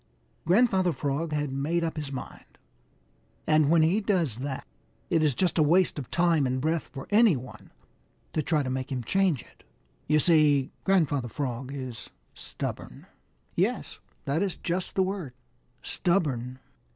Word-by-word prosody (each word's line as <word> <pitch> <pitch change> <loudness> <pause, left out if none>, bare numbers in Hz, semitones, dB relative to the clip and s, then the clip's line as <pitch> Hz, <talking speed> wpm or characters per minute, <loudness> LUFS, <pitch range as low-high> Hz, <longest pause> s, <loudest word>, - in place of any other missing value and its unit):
Grandfather 190 -3 +3
Frog 145 +3 -2
had 150 -2 -1
made 150 +6 -1
up 165 - -2
his 150 -3 -5
mind, 130 - -9 0.9
and 155 -2 +4
when 165 -1 +5
he 180 +7 +2
does 175 - 0
that, 135 +1 -4 0.5
it 165 -2 +3
is 150 -5 +2
just 180 +1 +1
a - - +6
waste 170 +2 +3
of 130 - -7
time 165 -5 +2
and 130 +1 -1
breath 160 +3 -1
for 135 - -8
any 215 -4 +6
one 125 0 -9 0.6
to 155 - +1
try 150 -1 +1
to 130 - -3
make 130 +1 -3
him 125 -2 -2
change 185 -2 +1
it. - - -23 0.5
You 150 - +4
see 150 -3 +4
Grandfather 150 -9 +2
Frog 130 0 -4
is 130 -4 -7 0.2
stubborn. - - -7 0.5
Yes, - - -1 0.3
that 140 +4 0
is 195 -3 -1
just 180 +1 -3
the 190 - +3
word 185 -9 -4 0.5
stubborn. 135 -9 0
155 Hz, 155 wpm, -27 LUFS, 135-175 Hz, 0.9 s, a